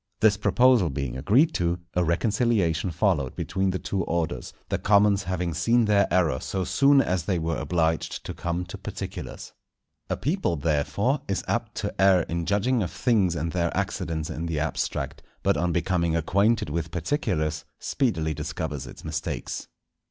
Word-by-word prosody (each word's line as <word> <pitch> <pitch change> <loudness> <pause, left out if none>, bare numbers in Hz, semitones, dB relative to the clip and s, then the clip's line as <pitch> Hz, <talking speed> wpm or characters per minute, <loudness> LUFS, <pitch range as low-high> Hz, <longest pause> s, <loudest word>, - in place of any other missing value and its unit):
This 105 -1 +5
proposal 105 0 +4
being 65 -3 -3
agreed 120 - +3
to, 85 0 0 0.2
a 90 - +2
reconciliation 95 0 +1
followed 80 - 0
between 95 0 -1
the 95 - -1
two 95 +1 -2
orders; 80 -7 -2 0.2
the - - 0
commons 100 -1 +4
having 90 -2 -2
seen 115 +9 +3
their 100 -2 +3
error 80 -8 +2
so 95 -1 -3
soon 140 +8 +4
as 90 -3 -1
they 95 -3 +1
were 80 -1 -1
obliged 80 -2 -1
to - - -4
come 85 +1 -3
to 85 - -9
particulars. - - -7 0.6
A - - -1
people 150 - 0
therefore 85 - 0
is 95 -2 -1
apt - - -2
to - - -3
err 95 -2 +6
in 85 0 -3
judging 115 +6 +2
of 90 - -1
things 100 -5 +1
and 85 +1 -2
their 85 -1 0
accidents 80 0 -2
in 80 +2 -4
the 80 -3 -1
abstract, 80 +1 -2 0.2
but - - +3
on 90 0 0
becoming 85 -1 +1
acquainted 100 +3 +2
with 85 +1 -2
particulars, 80 - -1
speedily 80 - 0
discovers 75 -2 -4
its - - -11
mistakes. 80 0 -4
90 Hz, 165 wpm, -26 LUFS, 80-100 Hz, 0.6 s, err